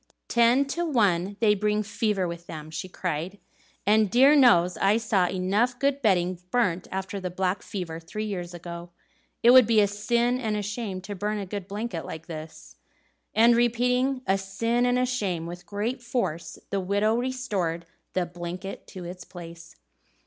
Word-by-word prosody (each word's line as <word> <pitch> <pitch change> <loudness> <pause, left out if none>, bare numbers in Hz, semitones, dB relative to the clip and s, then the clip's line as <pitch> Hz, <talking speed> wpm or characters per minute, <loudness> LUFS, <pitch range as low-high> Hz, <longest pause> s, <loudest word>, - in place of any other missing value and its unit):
"Ten 240 +4 +4
to 335 +5 -2
one 200 - +1
they 215 -2 +5
bring 210 +1 0
fever 210 -3 -1
with 170 0 -7
them!" 155 -1 -8
she 185 +3 -5
cried; 180 +1 -3 0.5
"and 215 0 +4
dear 265 +8 +6
knows 180 - +5
I 200 +3 +3
saw 210 -5 +2
enough 200 +8 0
good 280 +1 0
bedding 185 -5 +2
burnt 185 -7 +1
after 190 +1 -4
the 185 -1 -4
black 185 +2 -1
fever, 170 -5 -5
three 215 +6 -5
years 180 -4 -4
ago! 170 0 -8 0.5
It 240 - +8
would 255 -2 +8
be 225 -2 +4
a 205 - +6
sin 235 +5 0
and 220 -4 -1
a 205 - -2
shame 205 -2 -4
to 200 +2 -6
burn 210 +2 -2
a 200 - -4
good 195 0 -6
blanket 205 -4 -4
like 160 0 -8
this." 155 - -9 0.6
And 230 +2 +6
repeating 250 +2 +1
"a 195 +1 +2
sin 230 +6 0
and 245 0 +2
a 250 - +2
shame" 200 -10 -2
with 175 +1 -8
great 215 +7 -3
force, 235 -9 -3
the 200 - 0
widow 205 +3 +1
restored 215 -10 -2 0.3
the 185 -1 +1
blanket 175 +2 -7
to 185 - -9
its 180 +1 -8
place. 170 -1 -11
200 Hz, 175 wpm, -26 LUFS, 180-235 Hz, 0.6 s, It